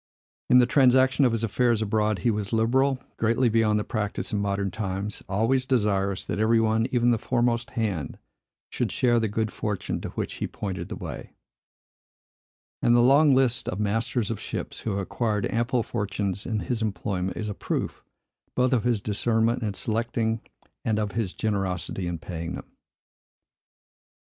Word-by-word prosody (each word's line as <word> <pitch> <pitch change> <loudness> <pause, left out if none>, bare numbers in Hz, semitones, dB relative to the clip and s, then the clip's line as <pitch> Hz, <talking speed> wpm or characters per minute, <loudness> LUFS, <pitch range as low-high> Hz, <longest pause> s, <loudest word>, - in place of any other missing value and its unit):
In 125 - +7
the 125 - +7
transaction 130 +1 +4
of 125 - +3
his 115 0 -1
affairs 115 +1 +2
abroad, 110 -1 +1
he 120 - +5
was 105 -2 -3
liberal, 130 +4 +2 0.2
greatly 115 +2 +2
beyond 110 -1 +3
the - - -1
practice 105 -1 -2
in 105 - +1
modern 100 -1 -1
times, 100 0 -4
always 115 +7 +2
desirous 100 -6 +1
that - - -3
every 115 +1 +4
one, 110 +1 +2
even 120 -1 +3
the 115 - +1
foremost 120 -1 0
hand, 100 -9 -2 0.5
should - - -1
share 120 -2 +3
the 110 - +1
good 110 +1 -1
fortune 105 -3 -3
to - - -5
which - - -4
he - - 0
pointed 95 -4 -5
the - - -4
way; - - -7 1.5
and 120 - +4
the - - +6
long 140 +3 +6
list 130 -1 +2
of 90 - -4
masters 110 +2 0
of 115 - -3
ships, - - -5
who - - -4
have 100 -1 -1
acquired 105 0 -1
ample 120 +1 +1
fortunes 100 -4 -3
in 110 -3 -1
his 120 -3 -2
employment, 95 -3 -2
is 110 - -3
a 105 - -3
proof, - - -3 0.5
both 130 +1 +2
of 120 - +2
his 120 -4 +1
discernment 115 +3 +1
in 105 -3 -2
selecting 115 +1 -1 0.4
and 110 -2 0
of 105 -1 -1
his 100 -2 -2
generosity 95 -4 -2
in 85 -1 -2
paying 85 0 -5
them. - - -10
110 Hz, 170 wpm, -26 LUFS, 100-120 Hz, 1.5 s, In